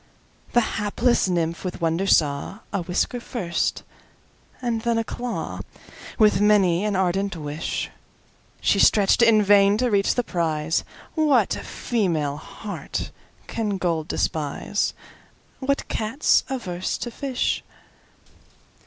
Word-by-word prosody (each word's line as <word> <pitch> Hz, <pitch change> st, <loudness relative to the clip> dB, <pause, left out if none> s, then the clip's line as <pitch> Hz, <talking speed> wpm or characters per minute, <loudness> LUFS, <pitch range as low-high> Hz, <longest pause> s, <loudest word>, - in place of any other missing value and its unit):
The 240 Hz, -, +5 dB, 0.2 s
hapless 220 Hz, +1 st, +2 dB
Nymph 170 Hz, -2 st, -1 dB
with 180 Hz, -1 st, -4 dB
wonder 165 Hz, +3 st, 0 dB
saw:A 165 Hz, +6 st, +1 dB
whisker 180 Hz, +7 st, -1 dB
first, 195 Hz, -8 st, -2 dB, 0.8 s
and 235 Hz, -3 st, -1 dB
then 235 Hz, 0 st, +1 dB
a 225 Hz, -, +1 dB
clawWith 225 Hz, -3 st, -2 dB
many 200 Hz, -4 st, +4 dB
an 210 Hz, -2 st, 0 dB
ardent 190 Hz, +1 st, 0 dB
wishShe 150 Hz, -1 st, -3 dB, 0.7 s
stretch'd, 200 Hz, +2 st, +4 dB
in 225 Hz, -2 st, +6 dB
vain, 200 Hz, 0 st, +5 dB
to 245 Hz, +1 st, +1 dB
reach 200 Hz, -1 st, +2 dB
the 245 Hz, -, +1 dB
prize—What 175 Hz, -, 0 dB
female 165 Hz, -, -1 dB
heart 210 Hz, +6 st, -6 dB, 0.3 s
can 210 Hz, -3 st, -2 dB
gold 165 Hz, -4 st, -1 dB
despise? 155 Hz, +6 st, -1 dB, 0.6 s
What 275 Hz, +1 st, -1 dB
Cat's 225 Hz, +7 st, +1 dB
averse 185 Hz, -9 st, -3 dB
to 240 Hz, -, -5 dB
fish? 265 Hz, 0 st, -1 dB
200 Hz, 105 wpm, -24 LUFS, 170-230 Hz, 0.8 s, in